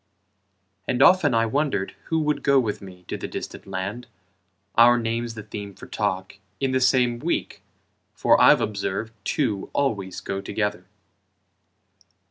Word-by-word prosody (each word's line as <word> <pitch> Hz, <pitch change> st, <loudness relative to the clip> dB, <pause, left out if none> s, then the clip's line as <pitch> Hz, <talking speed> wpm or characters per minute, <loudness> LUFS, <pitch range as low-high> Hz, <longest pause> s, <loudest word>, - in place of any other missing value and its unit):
And 125 Hz, -, 0 dB
often 155 Hz, -8 st, +5 dB
I 115 Hz, 0 st, +3 dB
wondered 135 Hz, -5 st, -1 dB
who 160 Hz, -, -1 dB
would 150 Hz, -1 st, 0 dB
go 140 Hz, -1 st, +4 dB
with 110 Hz, -5 st, -2 dB
me 90 Hz, -2 st, -12 dB
To -, -, -4 dB
the -, -, -5 dB
distant -, -, -7 dB
land, 100 Hz, +6 st, -4 dB, 0.7 s
our 120 Hz, +1 st, +6 dB
names 115 Hz, 0 st, -2 dB
the 110 Hz, -, -7 dB
theme 100 Hz, -2 st, -8 dB
For -, -, -11 dB
talk, 95 Hz, 0 st, -3 dB, 0.2 s
in 135 Hz, -1 st, 0 dB
the 130 Hz, 0 st, +1 dB
same 125 Hz, -2 st, +3 dB
week, -, -, -2 dB, 0.5 s
for -, -, +4 dB
I've -, -, +7 dB
observed 105 Hz, +1 st, -3 dB
Two 110 Hz, -8 st, -1 dB
always 100 Hz, -10 st, -1 dB
go 95 Hz, 0 st, -4 dB
together. 105 Hz, +1 st, -2 dB
115 Hz, 145 wpm, -24 LUFS, 100-130 Hz, 0.7 s, I've